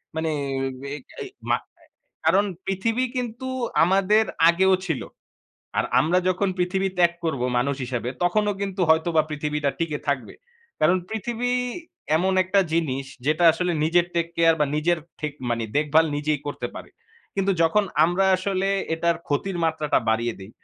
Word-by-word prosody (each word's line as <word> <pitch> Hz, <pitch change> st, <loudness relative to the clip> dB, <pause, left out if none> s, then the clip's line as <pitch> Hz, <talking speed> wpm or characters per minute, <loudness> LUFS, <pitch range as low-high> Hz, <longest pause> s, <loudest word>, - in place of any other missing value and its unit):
মানে 160 Hz, 0 st, -1 dB, 0.7 s
এ -, -, -5 dB, 0.2 s
এই -, -, -5 dB, 0.2 s
মা -, -, +4 dB, 0.2 s
আ -, -, -22 dB, 0.4 s
কারণ 190 Hz, +6 st, +4 dB, 0.2 s
পৃথিবী 225 Hz, +6 st, 0 dB
কিন্তু 245 Hz, +1 st, -4 dB, 0.4 s
আমাদের 195 Hz, +5 st, +3 dB, 0.2 s
আগেও 190 Hz, +2 st, +4 dB
ছিল। 160 Hz, -6 st, -2 dB, 0.8 s
আর -, -, +2 dB, 0.2 s
আমরা 170 Hz, +4 st, +2 dB
যখন 185 Hz, +2 st, +1 dB
পৃথিবী 190 Hz, +2 st, 0 dB
ত্যাগ 175 Hz, -1 st, +5 dB
করব 155 Hz, -6 st, -1 dB, 0.2 s
মানুষ 140 Hz, +3 st, 0 dB
হিসাবে, 120 Hz, -1 st, -3 dB
তখনও 205 Hz, +4 st, +2 dB
কিন্তু 195 Hz, -1 st, -3 dB
হয়তো 160 Hz, +1 st, +4 dB
বা 155 Hz, -, +6 dB
পৃথিবীটা 150 Hz, -1 st, -1 dB
টিকে 160 Hz, -3 st, -2 dB
থাকবে। 140 Hz, -2 st, -2 dB, 0.5 s
কারণ 155 Hz, +4 st, +4 dB
পৃথিবী 235 Hz, +3 st, -2 dB, 0.7 s
এমন 185 Hz, +4 st, +1 dB
একটা 195 Hz, +2 st, +3 dB
জিনিস 140 Hz, -5 st, 0 dB, 0.2 s
যেটা 155 Hz, +3 st, +2 dB
আসলে 180 Hz, +2 st, -1 dB
নিজের 175 Hz, +2 st, +3 dB
টেক 170 Hz, -1 st, +1 dB
কেয়ার 165 Hz, -1 st, +5 dB
বা 150 Hz, -, +4 dB
নিজের 170 Hz, +2 st, +1 dB, 0.2 s
ঠেক 150 Hz, -1 st, -2 dB, 0.2 s
মানে 115 Hz, -1 st, 0 dB
দেখভাল 155 Hz, +2 st, +4 dB
নিজেই 150 Hz, -1 st, -1 dB
করতে 145 Hz, -, -3 dB
পারে। -, -, -9 dB, 0.4 s
কিন্তু 195 Hz, 0 st, +1 dB
যখন 200 Hz, +6 st, +3 dB, 0.2 s
আমরা 175 Hz, +3 st, +2 dB
আসলে 190 Hz, +1 st, -1 dB, 0.3 s
এটার 170 Hz, +1 st, +1 dB
ক্ষতির 175 Hz, +6 st, -1 dB
মাত্রাটা 155 Hz, -2 st, +1 dB
বাড়িয়ে 115 Hz, +1 st, 0 dB
দেই, 95 Hz, -, -10 dB
170 Hz, 155 wpm, -24 LUFS, 150-195 Hz, 0.8 s, বা